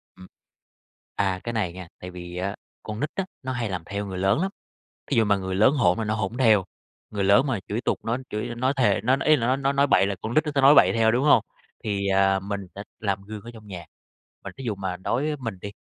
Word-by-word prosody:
Ừm. 95 0 -13 0.9
À, 95 -2 0
cái 120 - -4
này 95 -6 -1
nha, 90 -2 -9
tại 90 0 -8
vì 90 0 -8
á 100 +2 -2 0.3
con 105 0 -6
nít 150 - -1
á, 195 - -1 0.2
nó 130 - -3
hay 120 -4 -2
làm 90 -3 -4
theo 100 +1 -4
người 95 -2 -5
lớn 95 +10 +2
lắm. 195 +1 -1 0.6
Thí - - +1
dụ 115 - +5
mà 100 -1 +3
người 95 -1 -4
lớn 110 +8 +5
hỗn 105 -8 +3
là 110 - -1
nó 105 +1 -1
hỗn 110 +2 -3
theo, 110 -7 +4 0.5
người 100 -2 -2
lớn 105 +9 +5
mà 120 -8 -1
chửi 110 +4 -2
tục - - -1
nó 115 +2 0
chửi 120 +3 -3
nói 130 +3 +1
thề, 105 -6 +3
nói 130 +2 +4
nói, 145 - -2
ý 155 - +7
là, 115 -3 -1
nói 130 +1 +2
nói 135 0 +1
nói 140 +1 +3
bậy 100 - +4
là 100 - -1
con 110 +2 -4
nít 155 - +4
nó 150 - -3
sẽ 140 - +3
nói 140 +2 +7
bậy - - +6
theo, 115 -1 +3
đúng 130 +4 +1
hông? 150 - +5 0.4
Thì, 100 -2 -1
à, 95 0 +3
mình 100 +1 -4
sẽ 100 - -6 0.2
làm 100 -2 -1
gương 105 0 -8
ở 120 - -9
trong 110 -1 -13
nhà, 90 -4 -8 0.6
mà - - -5
thí 135 - -8
dụ 110 -3 -1
mà 95 -2 -4
đối 115 +8 -1
với 150 0 -1
mình 110 -7 -5
đi, 100 0 -7
105 Hz, 270 wpm, -25 LUFS, 95-125 Hz, 0.9 s, ý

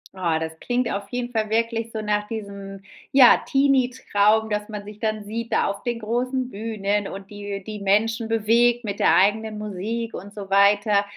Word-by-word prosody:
Ah, 170 -4 0
das 160 0 -3
klingt 245 0 -1
auf 200 0 -4
jeden 245 0 -4
Fall 215 -2 -1
wirklich 230 0 -1
so 220 -1 -4
nach 210 0 -1
diesem, 200 -3 -7 0.3
ja, 265 -3 +8
Teenietraum, 250 -6 +2
dass 210 0 -2
man 210 -2 -6
sich 210 0 -11
dann 215 -2 -2
sieht 230 +2 -5
da - - +2
auf 200 0 -3
den 240 -1 -2
großen 250 +3 -2
Bühnen 205 -1 -2
und 195 +1 -9
die 205 -1 -6
die 215 -1 -6
Menschen 220 +3 +1
bewegt 230 +2 +2
mit 205 -2 -4
der - - +4
eigenen 215 +2 +2
Musik 215 +3 -4
und 200 +2 -8
so 195 -2 -8
weiter. 200 +1 +4
215 Hz, 185 wpm, -23 LUFS, 200-230 Hz, 0.3 s, ja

